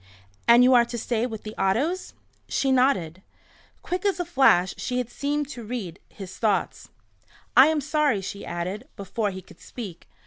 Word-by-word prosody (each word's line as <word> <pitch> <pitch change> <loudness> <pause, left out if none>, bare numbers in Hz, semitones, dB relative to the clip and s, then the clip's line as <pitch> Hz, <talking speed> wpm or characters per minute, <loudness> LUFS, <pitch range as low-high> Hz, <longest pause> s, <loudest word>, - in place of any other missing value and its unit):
"And 235 +1 +7
you 255 +1 +6
are 240 -1 +6
to 235 - -6
stay 235 +1 -1
with 220 -3 -7
the 215 - -7
Ottos?" 290 - 0 0.3
She 270 - +1
nodded. 250 - +1 0.6
Quick 360 0 -3
as 400 -2 0
a 355 - -1
flash 265 - +4
she 250 - -3
had 245 -1 -3
seemed 290 +2 -2
to 245 -6 -8
read 210 -6 -6
his 190 -2 -10
thoughts. 195 - -1 0.7
"I 260 +3 +9
am 315 -1 +1
sorry," 295 -6 +1
she 200 +1 -6
added, 185 +8 -5
before 205 +2 -2
he 190 -1 -8
could - - -18
speak. 200 -9 -9
235 Hz, 175 wpm, -25 LUFS, 195-275 Hz, 0.7 s, I